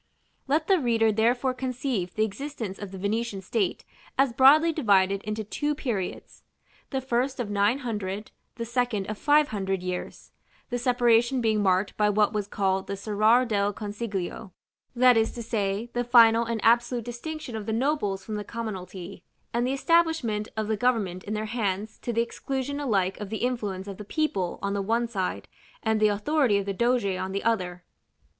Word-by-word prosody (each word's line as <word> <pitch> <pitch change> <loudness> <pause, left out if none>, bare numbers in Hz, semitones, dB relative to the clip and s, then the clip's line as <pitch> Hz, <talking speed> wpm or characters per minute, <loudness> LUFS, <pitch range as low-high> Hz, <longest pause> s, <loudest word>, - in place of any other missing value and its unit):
§ - - -44
IV. - - -45 0.4
Let 300 +3 +2
the 385 -2 +4
reader 230 -4 +2
therefore 245 +4 +2
conceive 250 -7 -3
the 215 - +2
existence 225 -3 -6
of 205 - -6
the 190 - -8
Venetian 205 +1 -2
state 195 -1 -1 0.3
as 270 -2 +3
broadly 300 +6 +6
divided 200 -8 +3
into 215 +1 -4
two 295 +8 -2
periods: 230 -11 -4 0.5
the 265 -1 -2
first 260 +1 -1
of 220 -4 -3
nine 205 +4 +2
hundred, 210 -2 -4 0.2
the 230 - -4
second 235 -4 -1
of 215 - -7
five 295 0 +4
hundred 195 -3 -2
years, 180 -1 -5 0.4
the 245 - -1
separation 240 0 +3
being 220 -3 +1
marked 190 0 +1
by 210 -1 +3
what 210 +1 +2
was 210 -2 -2
called 190 -2 0
the 200 - -4
"Serrar 215 +5 +3
del 205 -3 0
Consiglio;" 205 -2 -5 0.4
that 250 -1 +6
is 225 0 +1
to 235 - -6
say, 215 0 -2
the 245 - 0
final 235 -1 +6
and 230 -1 -2
absolute 235 0 +3
distinction 245 +2 -6
of 215 -2 -5
the - - -1
nobles 225 -5 0
from 215 -1 -4
the 210 - -4
commonalty, 195 -5 -6 0.3
and 240 +1 +1
the 260 - 0
establishment 275 -8 +1
of 215 -1 -1
the 220 - +1
government 210 -6 0
in 210 - -3
their 215 +1 -2
hands 215 -2 -2
to 240 - -3
the 230 0 +2
exclusion 270 +4 -4
alike 195 -9 0
of 205 -2 -6
the 220 - -3
influence 205 -6 -3
of 195 -2 -7
the 210 - -7
people 205 - -1
on 200 0 -1
the 200 - -1
one 230 +4 0
side, 195 -5 -3 0.4
and 220 -1 +1
the 215 - +5
authority 210 +2 +2
of 200 - -2
the 200 - -2
doge 240 +2 +1
on 185 0 -2
the 200 - -2
other. 180 -6 -1
220 Hz, 190 wpm, -26 LUFS, 200-245 Hz, 0.5 s, broadly